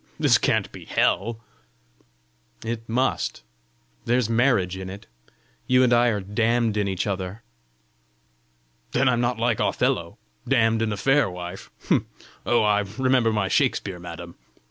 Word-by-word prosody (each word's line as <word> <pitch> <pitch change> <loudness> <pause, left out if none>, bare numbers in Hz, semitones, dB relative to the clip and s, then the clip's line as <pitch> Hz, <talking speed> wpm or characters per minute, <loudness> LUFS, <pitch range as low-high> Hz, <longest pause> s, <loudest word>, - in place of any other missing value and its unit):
This - - +4
can't - - 0
be - - -11
hell!" 115 +3 0 1.2
"It 115 0 -5
must: 125 - -1 0.6
there's 120 -1 +1
marriage 115 -7 +2
in 95 0 -6
it! 100 +2 -9 0.6
You 125 0 +4
and 125 -1 +3
I 120 +1 +4
are 110 -3 +1
damned 110 +3 0
in 105 -1 0
each 95 -1 -2
other." 100 +2 -4 1.5
"Then 130 +2 +2
I'm 120 -2 +2
not 120 -1 0
like 115 -1 0
Othello, - - 0 0.3
damned 115 -4 +2
in 110 -1 0
a 105 - -3
fair 135 +2 +3
wife! 90 +1 -8 0.8
Oh, 120 - +3
I 105 -1 +3 0.2
remember 130 -3 +3
my 105 -3 0
Shakspeare, 95 -1 0
madam!" 85 0 -9
115 Hz, 140 wpm, -24 LUFS, 95-120 Hz, 1.5 s, This